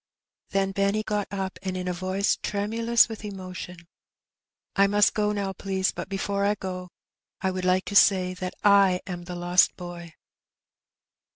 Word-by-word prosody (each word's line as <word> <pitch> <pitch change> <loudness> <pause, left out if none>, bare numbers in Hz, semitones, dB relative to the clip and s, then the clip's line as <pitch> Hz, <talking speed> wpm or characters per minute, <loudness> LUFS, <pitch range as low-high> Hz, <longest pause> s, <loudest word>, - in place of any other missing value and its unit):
Then 195 0 0
Benny 200 +2 0
got 210 -1 -2
up, 190 -1 -4
and 190 -1 -3
said 185 - -3
in 180 - -5
a 180 - 0
voice 185 +3 0
tremulous 225 +3 +2
with 220 -1 -8
emotion, 185 -3 -8 0.9
^^I 200 0 +4
must 205 0 +4
go 210 -1 +1
now, 200 -2 -2
please; 190 0 -1
but - - -7
before 200 0 -2
I 205 +1 +2
go 185 -2 -6 0.5
I 190 -1 0
would 185 0 -4
like 185 +1 +2
to 200 - -5
say 185 -2 +5
that 185 0 -5
I 200 -3 +5
am 175 -2 -6
the 180 0 -6
lost 175 +1 +3
boy." 175 -2 -9
190 Hz, 170 wpm, -26 LUFS, 180-200 Hz, 0.9 s, say